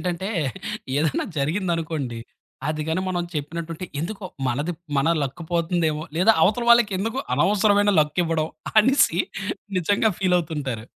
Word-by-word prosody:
ఏంటంటే, 180 +2 -2 0.7
ఏదైనా 150 -1 +1
జరిగిందనుకోండి, 160 - -1 0.5
అది 155 0 -1
గాని 165 +3 0
మనం 175 -1 -1
చెప్పినట్టుంటే, 165 +4 -4 0.2
ఎందుకో 195 +4 -5 0.2
మనది 145 +8 -1 0.3
మన 140 +4 +2
లక్ 140 +5 -4
పోతుందేమో, 165 -2 0 0.2
లేదా 225 +5 +6
అవతల 235 +4 +1
వాళ్ళకెందుకు 225 +1 +3 0.2
అనవసరమైన 205 0 +3
లక్ 150 +3 -1
ఇవ్వడం 160 -1 0 0.3
అనేసి 240 - +3 0.6
నిజంగా 205 +5 +2
ఫీల్ 185 -2 +2
అవుతుంటారు. 140 -9 -4
170 Hz, 120 wpm, -23 LUFS, 155-195 Hz, 0.7 s, లేదా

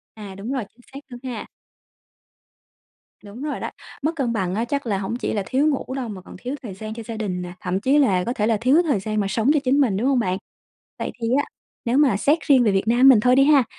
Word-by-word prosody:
À, 205 -3 -9
đúng 210 +7 -6
rồi, 255 -6 -2
chính 245 - -27
xác 275 - -8
luôn 245 -1 -10
ha. 245 -4 -5 1.8
Đúng 210 +7 -10
rồi 300 -1 -3
đó, - - -4 0.3
mất 315 +3 +1
cân 255 -6 0
bằng 190 -4 -1
á 225 +3 0
chắc 280 +1 -3
là 200 -3 0
hổng 200 +4 -3
chỉ - - -3
là 205 - -1
thiếu 275 +4 +1
ngủ 275 -3 -1
đâu 250 -4 -3
mà 195 -3 -7
còn - - -12
thiếu 255 +3 -3
thời 205 -6 -7
gian 215 +2 -7
cho 230 - -7
gia 230 - -5
đình 185 -5 -3
nè, 175 0 -7
thậm 185 +1 -2
chí 275 +6 +3
là 190 -10 +3
có 240 - -1
thể 210 -3 -1
là 225 -1 +2
thiếu 260 +10 +4
thời 280 - 0
gian 215 +1 -2
mà 200 - 0
sống 225 +6 +1
cho 300 - +3
chính 275 +3 +3
mình, 220 -8 +2
đúng 245 +6 +1
hông 270 -2 +3
bạn? 185 -4 0 0.6
Vậy - - -3
thì 230 - 0
á, 290 - +1 0.4
nếu 245 +4 +1
mà 275 -9 +4
xét 290 +10 +2
riêng 265 -4 +5
về 210 - +3
Việt 195 +2 0
Nam 245 +3 +6
mình 240 -6 +7
thôi 250 +3 +4
đi 275 - +6
ha, 280 -3 +5
235 Hz, 270 wpm, -22 LUFS, 205-270 Hz, 1.8 s, mình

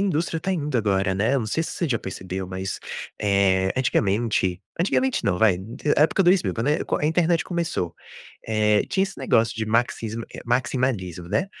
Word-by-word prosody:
a - - +2
indústria 165 -2 -1
tá 190 - -1
indo 150 -6 -1
agora, 95 -3 +1
né, 110 +8 +1
eu 135 - +2
não 110 - -3
sei 160 +9 0
se - - -5
você 170 - -2
já 115 -5 +1
percebeu, 95 0 -5
mas, 95 +1 -4 0.4
eh, 95 -2 +2
antigamente 105 -6 +1 0.2
antigamente 255 +8 +1
não, 90 -3 +1
vai, 100 -4 +4 0.4
época 160 +6 +4
2000, 180 0 +3
quando 115 +2 -3
é 150 - +2 0.2
a 150 - +1
internet 165 +1 +2
começou, 170 - -2 0.5
eh, 105 -1 +3
tinha 190 - +1
esse 195 - -8
negócio 115 -4 +2
de 110 - -1
maxismo 115 0 -1
eh, - - -7
maximalismo, 120 -8 -1
né, 185 - +1
115 Hz, 180 wpm, -24 LUFS, 95-155 Hz, 0.5 s, vai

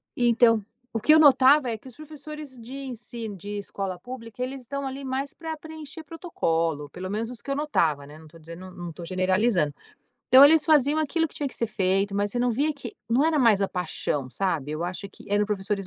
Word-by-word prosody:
E, 240 -1 +2
então, 230 -2 +4 0.3
o 225 - 0
que 305 - +3
eu 315 - +7
notava, 280 -2 +6
é 220 - -3
que 260 - -16
os 250 - -12
professores 305 -1 -9
de 235 +3 -10
ensi 240 -2 -7
de 205 +3 -6
escola 195 -2 -4
pública, 245 +1 -7
eles 265 +1 -5
estão, 280 +3 -5
ali, 270 +1 -5
mais 265 +2 -3
para 320 -1 -6
preencher 315 0 -10
protocolo, 165 - -2
pelo 185 +1 -6
menos 220 +3 -2
os 235 - -8
que 275 - -11
eu 275 - 0
notava, 165 - 0
né, 150 +2 -12
não 160 - -14
tô 165 +2 -16
dizendo 170 +3 -10
não 175 -1 -7
tô 170 - -9
generalizando. 185 -3 +1 0.6
Então, 260 +2 +9
eles 305 +1 +6
faziam 300 -1 +4
aquilo 325 +1 0
que - - -17
tinha 290 - -2
que - - -10
ser 230 - -1
feito, 195 -1 0
mas 205 0 0
você 245 - -2
não 245 0 +2
via 285 +7 +1
que 275 -6 -9
não 245 +4 +4
era 320 -1 +2
mais 230 -6 +5
a 195 - +1
paixão, 150 -7 -3
sabe. 165 -6 -1
Eu 155 +2 -3
acho 180 +3 -4
que 200 - -15
eram 205 0 +3
professores 200 -1 -2
230 Hz, 225 wpm, -26 LUFS, 185-280 Hz, 0.6 s, Então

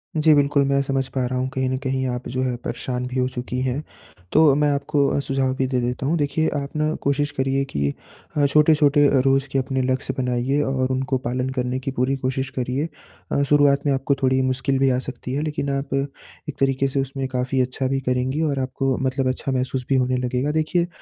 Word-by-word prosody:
जी, 155 0 +5
बिल्कुल 145 -1 +3
मैं 140 0 +2
समझ 135 -1 -1
पा 130 -1 +1
रहा 125 +1 -2
हूँ 130 - 0
कहीं 130 -1 0
न 130 - -1
कहीं 130 0 -2
आप 125 0 -4
जो 130 +1 -2
है 125 -1 -1
परेशान 125 -1 -3
भी 125 +1 -5
हो 125 - +2
चुकी 125 0 -4
हैं। 130 +3 -1 0.5
तो 155 -2 +6
मैं 150 0 +2
आपको 140 0 +1
अ, - - +1
सुझाव 135 -1 0
भी 130 - 0
दे 130 -1 0
देता 125 +2 -2
हूँ। 160 +5 +1
देखिए 155 +2 +1
आप 140 +1 -5
ना 155 0 +1
कोशिश 140 +1 0
करिए 135 +1 0
कि 70 - -1 0.4
अ, 145 - +4
छोटे-छोटे 150 0 +5
रोज़ 135 +1 +2
के 135 - +1
अपने 130 0 -1
लक्ष्य 130 +1 -1
बनाइए 125 +2 0
और 130 -2 0
उनको 130 0 0
पालन 125 +1 -2
करने 125 +1 -1
की 135 +1 -4
पूरी 130 +1 0
कोशिश 130 0 -2
करिए। 130 +5 -1 0.4
अ, - - +2
शुरुआत 145 -1 +4
में 145 - +3
आपको 135 +1 +1
थोड़ी 130 0 +3
मुश्किल 130 +1 0
भी 135 0 +4
आ 125 -1 +2
सकती 130 -1 -6
है 140 - 0
लेकिन 150 -2 -2
आप 140 0 -2
एक 140 +1 -5
तरीके 135 0 +2
से 135 0 0
उसमें 135 0 -3
काफ़ी 130 +1 0
अच्छा 130 +1 -1
भी 135 +1 0
करेंगी 130 +4 0
और 145 -4 0
आपको 130 0 -1
मतलब 130 0 0
अच्छा 130 +1 -2
महसूस 130 0 -1
भी 135 - +3
होने 130 0 +2
लगेगा। 125 +3 -1
देखिए 160 +3 +1
135 Hz, 220 wpm, -22 LUFS, 130-140 Hz, 0.5 s, तो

